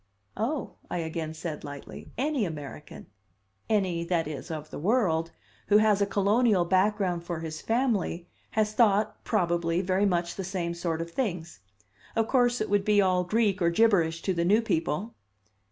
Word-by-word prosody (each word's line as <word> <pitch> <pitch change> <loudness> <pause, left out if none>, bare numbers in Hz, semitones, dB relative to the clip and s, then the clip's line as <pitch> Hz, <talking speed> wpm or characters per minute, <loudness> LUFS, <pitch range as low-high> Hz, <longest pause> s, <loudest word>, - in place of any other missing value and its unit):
"Oh," 250 +7 -3
I - - -2
again 160 -1 -4
said 160 -2 -5
lightly, 145 -1 -9
"any 280 -1 0
American 150 -4 -7 0.6
any, 185 -6 +1
that 170 -3 0
is, 150 -2 -6
of 155 -1 -6
the - - -6
world 165 - +1 0.4
who 205 - +6
has 210 -1 +3
a 200 - +3
colonial 205 -1 +3
background 185 -1 +1
for 170 -2 -4
his 155 -1 -6
family, 225 -8 0 0.3
has 215 -1 +2
thought, 215 -2 +2
probably, 170 -4 +1
very 190 +2 +1
much 175 -2 -1
the 195 - -3
same 175 -2 -3
sort 170 -1 -2
of 170 - -11
things. 175 -8 -3 0.6
Of 225 -1 +1
course 245 -2 +2
it 215 - -1
would 205 -1 +3
be 210 0 +3
all 185 -2 +3
Greek 205 0 +1
or 170 - +4
gibberish 170 -4 +2
to 190 - 0
the 170 -1 0
new 210 +6 +3
people." 190 +2 -1
185 Hz, 170 wpm, -28 LUFS, 170-215 Hz, 0.6 s, who